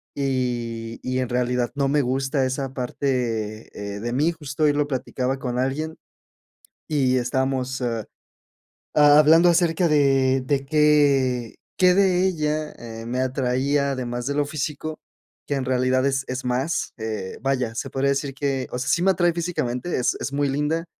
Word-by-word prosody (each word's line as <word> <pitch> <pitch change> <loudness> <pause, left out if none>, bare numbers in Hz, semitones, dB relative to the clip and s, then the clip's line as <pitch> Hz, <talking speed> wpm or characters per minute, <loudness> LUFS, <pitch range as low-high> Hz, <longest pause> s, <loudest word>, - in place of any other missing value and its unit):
Y 120 -4 -2
y 130 0 -1
en 130 -2 -1
realidad 125 0 0
no 140 -1 +1
me 145 +1 +3
gusta 135 +1 0
esa 130 0 -3
parte, 120 -4 -2 0.3
eh, - - -6
de 120 +1 -3
mí. 150 +6 +2
Justo 150 -2 -4
hoy 145 -1 +4
lo 145 0 0
platicaba 130 -1 -2
con 125 -2 -3
alguien 155 +5 -2 0.9
y 130 -4 +2
estamos, 130 +1 -1
ah, 115 -3 -2 0.9
hablando 150 +3 +6
acerca 170 0 +2
de 135 -3 +3
de 140 0 0
qué 140 -5 +3 0.2
qué 180 -1 +5
de 185 -1 +3
ella, 155 -3 -1
eh, 115 -1 -8
me 125 +2 -2
atraía 135 +2 0
además 120 -2 -4
de 140 - -1
lo 145 0 +1
físico, 155 +1 -4 0.5
que 145 - -1
en 135 - -2
realidad 130 +1 +2
es 135 -1 0
es 130 0 -4
más, 130 +6 -1
eh, 110 -4 -4
vaya, 130 -4 0
se - - -4
podría 135 +1 +1
decir 140 0 -1
que, 135 -2 -1
o 125 - -2
sea, 130 +3 -3
sí 170 - +2
me 195 - +4
atrae 175 -1 +2
físicamente, 165 -4 -2
es 125 - +1
es 140 - -3
muy 140 0 +1
linda. 150 +5 -1
135 Hz, 165 wpm, -23 LUFS, 125-150 Hz, 0.9 s, hablando